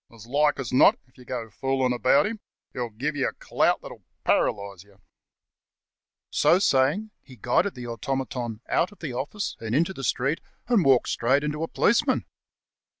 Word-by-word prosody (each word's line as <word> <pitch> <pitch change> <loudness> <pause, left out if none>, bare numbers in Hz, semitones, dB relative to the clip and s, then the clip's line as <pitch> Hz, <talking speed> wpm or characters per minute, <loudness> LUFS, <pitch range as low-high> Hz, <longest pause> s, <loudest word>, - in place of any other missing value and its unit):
As 115 -2 -14
like 145 +4 +2
as 135 - -4
not, 125 - +6
if 125 - -32
you 125 - -14
get 115 -4 -5
fooling 135 -1 0
about 130 +7 +3
him, 220 +1 -4 0.3
he'll 120 -2 -3
give 135 +8 -3
you 140 - +1
a - - -4
clout - - 0
that'll - - -11 0.2
paralyse 100 -2 0
you." 100 -1 -24 1.3
So 175 - +4
saying, 180 +5 +2 0.2
iie 130 - -13
guided 140 - +1
the 125 -1 -7
automaton 120 -1 -4
out 180 - +1
of 205 - -16
the 150 -7 -6
office 145 +12 -4
and 115 +1 -3
into 170 +6 +2
the 135 - -8
street, 135 +5 0 0.3
and 235 -6 +3
walked 135 -4 +4
straight 135 +5 +2
into 150 +1 -3
a 165 - -1
policeman. 220 +6 +2
135 Hz, 175 wpm, -25 LUFS, 120-150 Hz, 1.3 s, not